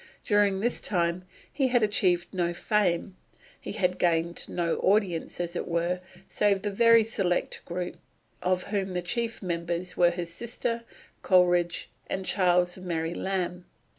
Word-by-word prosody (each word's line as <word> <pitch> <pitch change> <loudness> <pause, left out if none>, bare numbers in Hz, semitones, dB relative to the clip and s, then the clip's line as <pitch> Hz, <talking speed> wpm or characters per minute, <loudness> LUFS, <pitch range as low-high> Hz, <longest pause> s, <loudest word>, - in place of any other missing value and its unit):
During 205 -3 +3
this 240 +2 0
time 175 -2 0 0.3
he 270 -3 +2
had 245 -2 +3
achieved 185 -4 +1
no 175 -2 0
fame; 190 -2 0 0.4
he - - -6
had 180 -1 0
gained 170 0 +1
no 170 -2 -1
audience, 190 -5 +1
as 175 0 -3
it - - -3
were, 170 +1 0 0.3
save 200 -2 +1
the 205 - -1
very 230 +2 +6
select 195 -5 -1
group 180 +1 -4 0.4
of 185 0 +1
whom 195 -2 -2
the 180 -1 -2
chief 230 +4 -2
members 170 0 -3
were 175 -1 +5
his 170 -1 -5
sister, 235 +1 -3 0.4
Coleridge, 175 -2 +3 0.2
and 190 0 -3
Charles 180 -1 +2
and 185 0 -9
Mary 165 -1 -1
Lamb. 180 -2 -2
180 Hz, 150 wpm, -27 LUFS, 175-205 Hz, 0.4 s, very